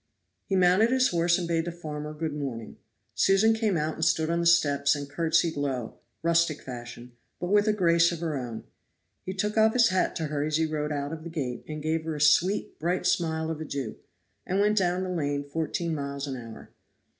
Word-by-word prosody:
He 195 Hz, -, 0 dB
mounted 185 Hz, +5 st, +4 dB
his 255 Hz, 0 st, +3 dB
horse 170 Hz, 0 st, +2 dB
and 175 Hz, -2 st, -3 dB
bade 165 Hz, -1 st, 0 dB
the 175 Hz, -, -3 dB
farmer 150 Hz, -3 st, -6 dB
good 155 Hz, 0 st, -4 dB
morning. 130 Hz, -6 st, -5 dB, 0.4 s
Susan 195 Hz, +3 st, +4 dB
came 220 Hz, -5 st, 0 dB
out 155 Hz, 0 st, -1 dB
and 160 Hz, -, -4 dB
stood 160 Hz, 0 st, +2 dB
on 170 Hz, -, +1 dB
the 170 Hz, -, +1 dB
steps 145 Hz, -4 st, +4 dB
and 145 Hz, -1 st, -5 dB
curtsied 165 Hz, +2 st, +1 dB
low 135 Hz, -5 st, -3 dB, 0.2 s
rustic 170 Hz, -2 st, +2 dB
fashion 120 Hz, -1 st, -9 dB, 0.3 s
but 180 Hz, +1 st, -3 dB
with 205 Hz, +1 st, +4 dB
a -, -, +5 dB
grace 170 Hz, -4 st, +3 dB
of 170 Hz, -, -5 dB
her 165 Hz, -3 st, -2 dB
own. 120 Hz, -4 st, -5 dB, 0.6 s
He 185 Hz, -, -4 dB
took 210 Hz, +3 st, -2 dB
off 220 Hz, 0 st, +5 dB
his 235 Hz, -2 st, +5 dB
hat 185 Hz, -1 st, 0 dB
to 160 Hz, -, -2 dB
her 150 Hz, -1 st, -2 dB
as 155 Hz, 0 st, 0 dB
he 160 Hz, -, +2 dB
rode 155 Hz, -1 st, -2 dB
out 145 Hz, +1 st, -3 dB
of 160 Hz, -1 st, -7 dB
the 170 Hz, -, -6 dB
gate, 130 Hz, -7 st, -4 dB
gave 155 Hz, +1 st, -2 dB
her 160 Hz, -1 st, -3 dB
a -, -, -5 dB
sweet, 170 Hz, +7 st, +2 dB
bright 175 Hz, +3 st, -1 dB
smile 160 Hz, -1 st, 0 dB
of 160 Hz, -1 st, -5 dB
adieu, 140 Hz, -6 st, -4 dB, 0.5 s
and 190 Hz, -, -1 dB
went 210 Hz, +1 st, +3 dB
down 180 Hz, 0 st, 0 dB
the 185 Hz, -, -4 dB
lane 145 Hz, -4 st, -1 dB
fourteen 160 Hz, +3 st, -3 dB
miles 140 Hz, -1 st, -4 dB
an 135 Hz, -2 st, -4 dB
hour. 115 Hz, -3 st, -10 dB
160 Hz, 215 wpm, -27 LUFS, 145-175 Hz, 0.6 s, a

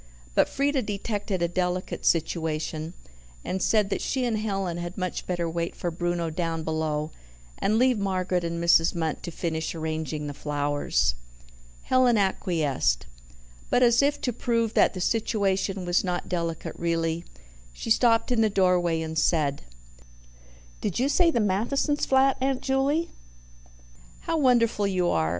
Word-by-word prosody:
But -, -, +3 dB
Frieda 280 Hz, 0 st, +1 dB
detected 205 Hz, -3 st, -3 dB
a -, -, +3 dB
delicate 180 Hz, +1 st, -2 dB
situation, 160 Hz, 0 st, -1 dB, 0.5 s
and 190 Hz, -, -2 dB
said 210 Hz, -1 st, +2 dB
that -, -, -1 dB
she 260 Hz, -2 st, -1 dB
and 225 Hz, -3 st, 0 dB
Helen 195 Hz, -5 st, -2 dB
had 175 Hz, +2 st, -6 dB
much 185 Hz, -1 st, -3 dB
better 175 Hz, -2 st, -1 dB
wait 170 Hz, +1 st, -3 dB
for 175 Hz, -, -3 dB
Bruno 175 Hz, -1 st, -2 dB
down 165 Hz, -1 st, -2 dB
below, 155 Hz, -1 st, -2 dB, 0.5 s
and 215 Hz, +2 st, +1 dB
leave 250 Hz, -2 st, +3 dB
Margaret 185 Hz, -2 st, -1 dB
and 170 Hz, 0 st, -3 dB
Mrs. 170 Hz, 0 st, +4 dB
Munt 160 Hz, -2 st, -2 dB
to -, -, -5 dB
finish 165 Hz, -1 st, -3 dB
arranging 155 Hz, -1 st, -3 dB
the 145 Hz, -, -4 dB
flowers. 145 Hz, -, 0 dB, 0.7 s
Helen 255 Hz, -3 st, +3 dB
acquiesced. 160 Hz, -, 0 dB, 0.6 s
But, 250 Hz, -, +3 dB
as 240 Hz, +1 st, +5 dB
if 285 Hz, +1 st, +1 dB
to 245 Hz, -, -1 dB
prove 230 Hz, -1 st, 0 dB
that -, -, +3 dB
the 185 Hz, -, -4 dB
situation 195 Hz, -3 st, 0 dB
was 175 Hz, 0 st, +2 dB
not 180 Hz, -2 st, -2 dB
delicate 170 Hz, -2 st, -3 dB
really, 165 Hz, 0 st, -1 dB, 0.5 s
she 140 Hz, -, -6 dB
stopped 230 Hz, +1 st, +3 dB
in 235 Hz, -2 st, +2 dB
the 220 Hz, -, +3 dB
doorway 180 Hz, -4 st, +2 dB
and 160 Hz, 0 st, -5 dB
said: 145 Hz, -5 st, +1 dB, 1.2 s
"Did 205 Hz, -, -2 dB
you 260 Hz, +3 st, +1 dB
say 335 Hz, +4 st, +4 dB
the 275 Hz, -, +1 dB
Mathesons' 230 Hz, +9 st, 0 dB
flat, 265 Hz, 0 st, +4 dB
Aunt 265 Hz, -1 st, 0 dB
Juley? 280 Hz, +5 st, +1 dB, 1.1 s
How 330 Hz, -, -2 dB
wonderful 235 Hz, -6 st, +3 dB
you 180 Hz, -2 st, +1 dB
are! 80 Hz, -1 st, +1 dB
180 Hz, 150 wpm, -26 LUFS, 165-230 Hz, 1.2 s, as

